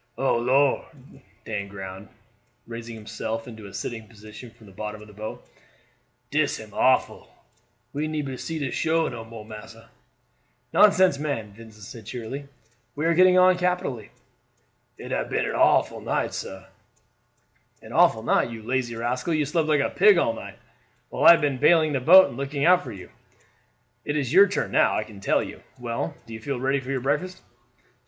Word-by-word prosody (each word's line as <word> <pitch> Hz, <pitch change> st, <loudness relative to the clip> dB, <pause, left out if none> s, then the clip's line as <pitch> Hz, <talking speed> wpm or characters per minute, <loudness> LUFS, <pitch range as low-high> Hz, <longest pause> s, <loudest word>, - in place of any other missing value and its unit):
"Oh 135 Hz, -3 st, +1 dB
Lor'!" 130 Hz, +3 st, +2 dB, 0.6 s
Dan 105 Hz, -2 st, -4 dB
groaned, 95 Hz, 0 st, -9 dB, 0.6 s
raising 115 Hz, 0 st, -8 dB
himself 110 Hz, +1 st, -5 dB
into 110 Hz, -4 st, -10 dB
a 100 Hz, -, -13 dB
sitting 110 Hz, +2 st, -5 dB
position 110 Hz, +2 st, -12 dB
from 115 Hz, -1 st, -20 dB
the 100 Hz, -, -15 dB
bottom 105 Hz, +2 st, -6 dB
of 105 Hz, -, -13 dB
the 105 Hz, -, -15 dB
boat, 110 Hz, +2 st, -8 dB, 0.8 s
"dis -, -, +1 dB
am -, -, -12 dB
awful; -, -, +1 dB, 0.6 s
we 150 Hz, +2 st, -2 dB
neber 150 Hz, -4 st, -3 dB
see 160 Hz, +5 st, -5 dB
the 140 Hz, -5 st, -3 dB
shore 165 Hz, 0 st, 0 dB
no 115 Hz, -1 st, -7 dB
more, 115 Hz, -1 st, -11 dB
massa." 110 Hz, -1 st, -12 dB, 0.8 s
"Nonsense, 185 Hz, -7 st, +5 dB
man," 115 Hz, -9 st, -4 dB
Vincent 110 Hz, -1 st, -14 dB
said 110 Hz, 0 st, -11 dB
cheerily; 125 Hz, +5 st, -6 dB, 0.5 s
"we 150 Hz, +2 st, -2 dB
are 165 Hz, -, +3 dB
getting 185 Hz, +2 st, +5 dB
on 185 Hz, 0 st, +5 dB
capitally." 180 Hz, -, -2 dB, 0.9 s
"It -, -, -9 dB
hab -, -, -2 dB
been -, -, 0 dB
an -, -, -2 dB
awful -, -, +2 dB
night, -, -, -2 dB
sah." 95 Hz, 0 st, -7 dB, 1.2 s
"An -, -, -11 dB
awful -, -, +4 dB
night! -, -, +2 dB
You 115 Hz, -2 st, -8 dB
lazy 120 Hz, 0 st, -2 dB
rascal, 125 Hz, +7 st, -2 dB
you 150 Hz, -1 st, +1 dB
slept 155 Hz, +2 st, 0 dB
like 150 Hz, -2 st, +3 dB
a -, -, -1 dB
pig 425 Hz, -1 st, +5 dB
all -, -, +2 dB
night, -, -, -9 dB, 0.5 s
while -, -, -2 dB
I -, -, +11 dB
have 170 Hz, -, +1 dB
been 140 Hz, -3 st, 0 dB
bailing 160 Hz, -1 st, +4 dB
the 135 Hz, -, +1 dB
boat 185 Hz, +8 st, +8 dB
and -, -, -9 dB
looking 140 Hz, +1 st, -2 dB
out 180 Hz, +1 st, +5 dB
for 125 Hz, -, -8 dB
you. 95 Hz, -4 st, -11 dB, 0.9 s
It 150 Hz, 0 st, -2 dB
is 135 Hz, -4 st, -2 dB
your 200 Hz, +1 st, +8 dB
turn 200 Hz, -, -2 dB
now, -, -, +3 dB
I 110 Hz, -, -1 dB
can 105 Hz, -2 st, -13 dB
tell -, -, +1 dB
you. -, -, -9 dB, 0.2 s
Well, 120 Hz, -2 st, -4 dB
do 115 Hz, -, -11 dB
you 110 Hz, -, -8 dB
feel 135 Hz, +1 st, -3 dB
ready 135 Hz, +2 st, +1 dB
for 130 Hz, 0 st, -10 dB
your 135 Hz, -2 st, -1 dB
breakfast?" 150 Hz, +8 st, -2 dB
125 Hz, 185 wpm, -25 LUFS, 110-150 Hz, 1.2 s, I